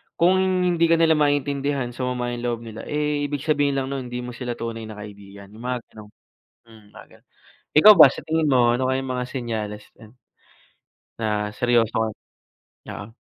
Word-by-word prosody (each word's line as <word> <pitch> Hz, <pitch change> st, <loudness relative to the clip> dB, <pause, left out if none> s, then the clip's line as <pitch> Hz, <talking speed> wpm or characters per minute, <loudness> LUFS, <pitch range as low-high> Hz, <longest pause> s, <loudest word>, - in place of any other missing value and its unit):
Kung 185 Hz, +2 st, +3 dB
hindi 180 Hz, -3 st, +2 dB
ka 165 Hz, -, +4 dB
nila 165 Hz, -1 st, +3 dB
maintindihan, 145 Hz, -3 st, 0 dB
sumama 125 Hz, 0 st, -3 dB
yung 120 Hz, -, -7 dB
loob 120 Hz, -1 st, -2 dB
nila, 110 Hz, -1 st, -9 dB
eh, 150 Hz, -1 st, -1 dB
ibig 145 Hz, -1 st, -4 dB
sabihin 145 Hz, -2 st, +1 dB
lang 135 Hz, 0 st, -2 dB
nun 135 Hz, -2 st, -4 dB
hindi 125 Hz, 0 st, -5 dB
mo 125 Hz, -, -6 dB
sila 120 Hz, 0 st, -5 dB
tunay 115 Hz, -1 st, -6 dB
na 110 Hz, -, -9 dB
kaibigan, 100 Hz, -1 st, -11 dB
yung 110 Hz, +3 st, -13 dB
mga 125 Hz, 0 st, -2 dB
gano'n. 105 Hz, -1 st, -13 dB, 0.6 s
Hmm, 110 Hz, -2 st, -17 dB
mga -, -, -13 dB
gano'n. -, -, -39 dB, 0.5 s
Ikaw 210 Hz, +8 st, +10 dB
ba 160 Hz, -7 st, +9 dB
sa -, -, -7 dB
tingin 160 Hz, -1 st, 0 dB
mo 125 Hz, -3 st, +4 dB
ano 130 Hz, +1 st, -1 dB
kayang 130 Hz, 0 st, -1 dB
mga 125 Hz, -1 st, -2 dB
senyales 110 Hz, -5 st, -5 dB
niyan 110 Hz, +3 st, -17 dB, 1.0 s
na 105 Hz, -2 st, -1 dB
seryoso 120 Hz, -2 st, +1 dB
ka? 110 Hz, 0 st, 0 dB, 0.8 s
Oo. 105 Hz, +3 st, -9 dB
125 Hz, 180 wpm, -23 LUFS, 115-145 Hz, 1.0 s, Ikaw